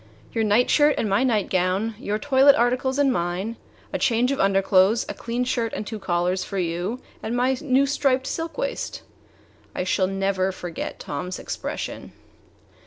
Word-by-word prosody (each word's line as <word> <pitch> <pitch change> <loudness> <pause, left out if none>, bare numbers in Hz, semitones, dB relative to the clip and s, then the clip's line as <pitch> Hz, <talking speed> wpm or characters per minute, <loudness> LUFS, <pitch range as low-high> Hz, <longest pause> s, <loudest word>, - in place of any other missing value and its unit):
"Your 225 - +1
nightshirt 245 +7 +4
and 220 - 0
my 200 +6 +2
nightgown; 200 -2 +1
your 210 -1 -2
toilet 275 +2 +5
articles 255 +3 +1
and 280 -2 +3
mine; 175 +6 -2 0.4
a - - -1
change 245 0 +2
of 275 - -2
underclothes; 195 +2 +3
a - - -4
clean 235 +2 -3
shirt 235 -2 -1
and 210 - -4
two 220 0 -6
collars 180 0 0
for 200 - -5
you, 180 +6 -2 0.2
and 235 +2 -2
my 255 +2 +2
new 275 -2 +3
striped 270 -2 +1
silk 325 +4 -4
waist." - - -3 0.7
I - - -1
shall 185 0 +1
never 195 0 0
forget 175 -3 -6
Tom's 180 +6 -5
expression. - - -5
225 Hz, 160 wpm, -24 LUFS, 190-260 Hz, 0.7 s, toilet